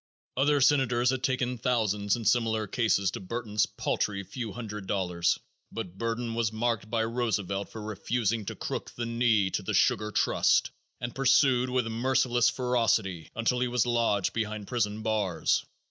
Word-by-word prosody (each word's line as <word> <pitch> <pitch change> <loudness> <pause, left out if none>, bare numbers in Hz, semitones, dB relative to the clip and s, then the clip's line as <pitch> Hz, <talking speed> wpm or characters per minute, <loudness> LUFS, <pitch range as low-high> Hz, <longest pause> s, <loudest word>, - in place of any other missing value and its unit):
Other 145 +2 +3
senators 130 -3 +3
had 130 -1 -2
taken 125 -2 -1
thousands 105 -5 +1
in 115 -2 -6
similar 110 -2 +2
cases 100 -4 +1
to - - -6
Burton's 105 +1 -1
paltry 100 -2 -2
few 115 +2 -6
hundred 105 -3 -7
dollars, 90 -4 0 0.3
but 90 0 -6
Burton 115 0 -2
was 115 -1 0
marked 110 -1 -1
by 115 -1 +1
Roosevelt 105 -4 -2
for 110 - -8
refusing 110 +1 -1
to - - -5
crook - - -4
the 120 - -3
knee 115 -5 +2
to - - -1
the - - -2
sugar 105 0 +2
trust - - +2 0.3
and 120 0 -4
pursued 130 -1 +3
with 125 -1 +1
merciless 120 +1 +2
ferocity 115 -9 0
until 115 +2 +1
he 125 - +1
was 125 -1 +1
lodged 115 -5 +1
behind 110 -2 -3
prison 110 -3 -1
bars. 100 -7 0
115 Hz, 160 wpm, -28 LUFS, 105-125 Hz, 0.3 s, Other